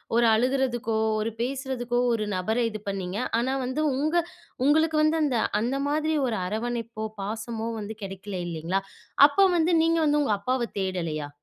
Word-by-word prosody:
ஒரு 235 0 +4
அழுகுறதுக்கோ, 240 -1 +1 0.2
ஒரு 215 +1 -1
பேசுறதுக்கோ 250 -1 -2
ஒரு 215 -2 -1
நபர்ர 220 +6 0
இது 215 -1 -6
பண்ணீங்க. 190 -1 -3 0.2
ஆனா, 255 +3 0
வந்து 260 +4 -2 0.2
உங்க 310 +4 0 0.5
உங்களுக்கு 315 +2 +3
வந்து 310 +1 +3
அந்த, 260 -5 +1 0.2
அந்த 250 +4 0
மாதிரி 310 +1 0
ஒரு 225 -3 -1
அரவணைப்போ, 230 +2 -3 0.2
பாசமோ 225 +2 -4
வந்து 215 +1 -6
கிடைக்கல 195 0 -6
இல்லேங்களா, 170 +4 -2 0.5
அப்ப 385 +7 +4
வந்து 335 +1 +2
நீங்க 330 0 +2
வந்து 295 0 +3
உங்க 215 - +1
அப்பாவ 250 +3 -1
தேடலயா? 165 -6 -3
235 Hz, 150 wpm, -26 LUFS, 210-275 Hz, 0.5 s, ஒரு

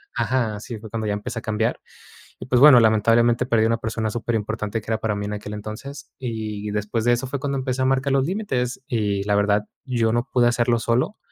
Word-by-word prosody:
Ajá, 115 -3 0
sí, 115 -2 -7
fue 110 0 -10
cuando 110 0 -3
ya 105 - 0
empecé 115 +3 -4
a - - -11
cambiar. 110 +2 -1 0.6
Y - - -7
pues 125 -1 +2
bueno, 145 -4 +9
lamentablemente, 115 +2 +3
perdí 115 -3 +3
una 115 0 +2
persona 110 -1 -3
superimportante, 110 -2 -2
que 110 - -7
era 110 - 0
para 110 -2 -1
mí 100 - -3
en 105 - -4
aquel 105 0 -6
entonces. 110 +7 -8
Y 110 -4 -4
después 105 +2 -2
de 120 - +4
eso 120 +2 -1
fue 140 +1 -4
cuando 140 -1 -2
empecé 130 0 -2
a - - +2
marcar 135 +1 +1
los 135 -1 +2
límites, 135 - -2
y 105 -4 -1
la 105 +1 0
verdad, 105 0 +2 0.2
yo 115 -4 +1
no 120 +3 0
pude 125 -2 +3
hacerlo 120 0 +2
solo, 125 - 0
115 Hz, 225 wpm, -23 LUFS, 105-125 Hz, 0.6 s, bueno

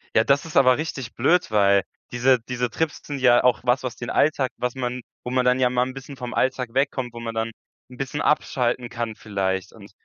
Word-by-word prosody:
Ja, 110 - +5
das 140 +4 +2
ist 160 - -9
aber 130 -1 +6
richtig 135 -6 -5
blöd, 165 +2 +2
weil 100 -2 +4 0.3
diese 125 +1 +3
diese 125 +1 -3
Trips 160 +7 -2
sind 145 -2 -4
ja 120 -2 +5
auch 125 -3 +3
was, 125 +1 +2
was 125 -2 -4
den 120 - -6
Alltag 140 -4 +2
was 125 -1 -2
man 125 -1 -3 0.2
wo 125 - -4
man 130 0 +2
dann 125 +1 +3
ja 125 -1 +3
mal 125 0 +1
'n 130 - -6
bisschen 135 +1 -9
vom 125 -2 -6
Alltag 125 -2 0
wegkommt, 130 -3 -1
wo 120 - -8
man 115 -1 -5
dann 115 0 -1 0.4
'n 125 - -13
bisschen 135 +3 -3
abschalten 125 -4 0
kann 115 -2 -4
vielleicht 95 -2 -3
und 100 -3 -14
125 Hz, 225 wpm, -23 LUFS, 115-130 Hz, 0.4 s, aber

